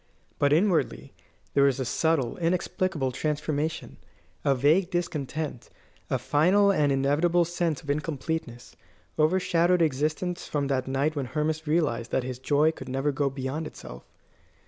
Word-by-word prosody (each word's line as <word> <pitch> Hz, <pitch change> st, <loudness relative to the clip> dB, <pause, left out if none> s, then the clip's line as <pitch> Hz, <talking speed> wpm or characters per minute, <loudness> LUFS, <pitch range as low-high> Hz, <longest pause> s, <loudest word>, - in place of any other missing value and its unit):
But 140 Hz, 0 st, +3 dB
inwardly 160 Hz, -, +1 dB, 0.4 s
there 140 Hz, -, +4 dB
was 135 Hz, -1 st, +2 dB
a 130 Hz, -, -1 dB
subtle, 155 Hz, -2 st, 0 dB
inexplicable 170 Hz, -4 st, -1 dB
transformation. 150 Hz, +2 st, -2 dB, 0.5 s
A 140 Hz, -, +3 dB
vague 155 Hz, +8 st, +3 dB
discontent, 155 Hz, -6 st, -3 dB, 0.4 s
a -, -, +1 dB
final 190 Hz, +7 st, +3 dB
and 150 Hz, -6 st, +2 dB
inevitable 150 Hz, +6 st, +2 dB
sense 170 Hz, -3 st, -2 dB
of 145 Hz, -, -11 dB
incompleteness, 150 Hz, -4 st, -4 dB, 0.4 s
overshadowed 175 Hz, +1 st, +3 dB
existence 155 Hz, +4 st, -1 dB
from 145 Hz, -2 st, -1 dB
that 130 Hz, -2 st, 0 dB
night 140 Hz, +4 st, 0 dB
when 140 Hz, -3 st, -2 dB
Hermas 155 Hz, +2 st, -2 dB
realised 150 Hz, -7 st, 0 dB
that 130 Hz, -, 0 dB
his 125 Hz, 0 st, -5 dB
joy 145 Hz, +4 st, +3 dB
could 135 Hz, -5 st, -10 dB
never 135 Hz, +3 st, 0 dB
go 140 Hz, 0 st, 0 dB
beyond 135 Hz, +4 st, -4 dB
itself. -, -, -11 dB
150 Hz, 140 wpm, -27 LUFS, 135-165 Hz, 0.5 s, there